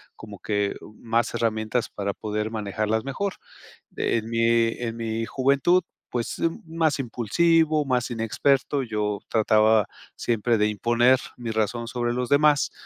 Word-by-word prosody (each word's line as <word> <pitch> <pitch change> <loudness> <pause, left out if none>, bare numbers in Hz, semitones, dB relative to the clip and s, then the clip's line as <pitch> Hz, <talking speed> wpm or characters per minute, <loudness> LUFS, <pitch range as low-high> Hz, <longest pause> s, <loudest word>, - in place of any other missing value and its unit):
como 105 -3 -11
que, 105 -1 -1
u 105 - -13
más 115 0 0
herramientas 110 0 -1
para 100 -1 -3
poder 105 +1 -3
manejarlas 110 0 -1
mejor. 190 +8 -2 0.6
En 110 -2 0
mi 115 0 +3
en 115 -2 -4
mi 115 0 -2
juventud, 140 +9 +2 0.3
pues, 120 -2 -3
mm, 165 0 -1 0.2
más 160 -3 +2
impulsivo, 155 +6 +2
más 125 -3 0
inexperto, 135 +5 +1
yo 105 -3 -2
trataba 110 -1 +3 0.3
siempre 115 0 0
de 105 - +3
imponer 120 +5 +3 0.2
mi 120 -2 -5
razón 110 +2 -1
sobre 120 -1 -1
los 125 0 -2
demás, 145 +1 +3
115 Hz, 140 wpm, -25 LUFS, 110-130 Hz, 0.6 s, mi